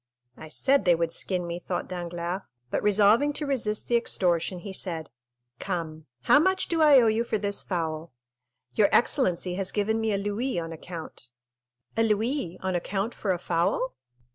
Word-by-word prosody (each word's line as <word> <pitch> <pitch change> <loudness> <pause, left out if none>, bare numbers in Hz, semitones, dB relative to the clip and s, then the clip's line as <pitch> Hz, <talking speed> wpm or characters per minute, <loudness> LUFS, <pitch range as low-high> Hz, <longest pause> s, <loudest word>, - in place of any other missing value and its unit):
"I 155 - -10
said 275 - +2
they 175 -1 +5
would 165 0 -1
skin 180 0 -1
me," 170 0 -4
thought 175 0 -4
Danglars; 175 +1 -4 0.3
but - - 0
resolving 210 +8 +4
to 300 - -2
resist 225 -7 -1
the 240 - +2
extortion, 180 -5 0
he 195 0 -7
said, 165 - -3 0.5
"Come, 160 -4 -4 0.2
how 290 - +6
much 375 +3 +2
do 330 -1 +1
I 295 -3 +8
owe 240 - +4
you 220 +1 +2
for 225 - -1
this 200 -1 -1
fowl?" 165 -3 -3 0.6
"Your 205 -2 +4
excellency 185 - +2
has 195 +1 -2
given 220 +2 0
me 220 -1 0
a 200 - +1
louis 205 +4 -2
on 165 -1 -5
account." 160 -6 -8 0.7
"A 225 - +2
louis 220 - 0
on 190 0 -1
account 195 +5 -2
for 200 - -2
a 180 - +1
fowl?" 175 +9 0
195 Hz, 175 wpm, -27 LUFS, 175-225 Hz, 0.7 s, I